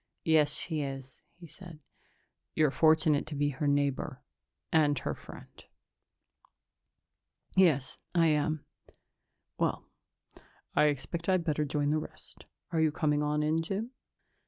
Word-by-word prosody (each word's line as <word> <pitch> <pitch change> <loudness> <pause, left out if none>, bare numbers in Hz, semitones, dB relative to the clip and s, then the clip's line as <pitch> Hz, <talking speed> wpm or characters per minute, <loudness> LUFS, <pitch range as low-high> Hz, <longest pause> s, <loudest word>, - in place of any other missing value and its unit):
"Yes, 155 -2 +4
she 160 -3 -1
is," 135 -2 -6 0.2
he 175 - -11
said. 165 -2 -13 0.7
"You're 155 -3 +3
fortunate 155 -1 +3
to 150 - -5
be 145 0 +1
her 145 +1 -2
neighbor... 140 -1 0 0.5
and 150 -3 +3
her - - -2
friend." - - -13 1.9
"Yes, 160 -9 +3 0.2
I 170 -1 +5
am." 155 0 0 0.9
"Well, - - 0 0.9
I - - +5
expect 150 +5 -2
I'd 185 -2 +3
better 150 -2 0
join 145 0 0
the 155 - +2
rest. - - -11 0.3
Are 165 -2 +1
you 155 -1 +3
coming 150 -1 +1
on 150 0 0
in, 155 +2 +1
Jim?" 200 +8 -3
150 Hz, 130 wpm, -30 LUFS, 145-160 Hz, 1.9 s, I